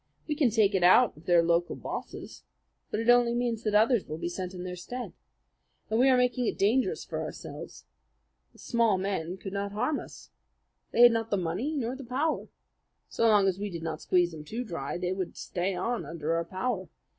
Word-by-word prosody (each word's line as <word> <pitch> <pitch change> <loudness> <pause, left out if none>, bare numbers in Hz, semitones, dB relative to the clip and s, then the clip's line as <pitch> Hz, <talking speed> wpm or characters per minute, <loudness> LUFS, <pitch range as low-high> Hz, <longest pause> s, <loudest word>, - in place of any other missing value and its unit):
We 305 - 0
can 290 -4 +3
take 215 -2 +3
it 190 - +1
out 195 +7 +6
of 155 - -17
their 175 -1 +5
local 170 +1 +1
bosses; - - -7 0.5
but - - -2
it 225 - -2
only 245 -1 +5
means 240 -2 -1
that 215 -2 -1
others 225 0 +3
will 155 - -5
be 170 +1 -3
sent 185 +1 -5
in 180 - -6
their 180 0 -5
stead. 245 +8 -6 0.8
And 220 - +2
we 265 +2 +5
are 255 - +5
making 250 -1 +1
it - - -2
dangerous 215 +2 +1
for - - -4
ourselves. - - -8 0.7
The - - -22
small 230 -4 +1
men 185 -2 -3
could 190 0 -7
not 200 0 -3
harm 250 +8 0
us. - - -12 0.6
They - - +2
had 240 - +9
not 225 -1 -1
the 205 - +1
money 190 - -2
nor 250 -2 -2
the 270 - -8
power. 275 +6 -1 0.6
So 230 - +1
long 205 -3 +5
as 190 0 0
we 205 0 -3
did 170 -3 -6
not 165 -1 -4
squeeze 175 -1 +2
them 155 -2 -9
too 225 +11 -4
dry, 165 - -4
they 180 +1 -1
would 185 -2 -5
stay 185 +2 -2
on 235 +5 -2
under 165 -1 -3
our 165 0 0
power. 185 0 -3
200 Hz, 215 wpm, -28 LUFS, 180-240 Hz, 0.8 s, had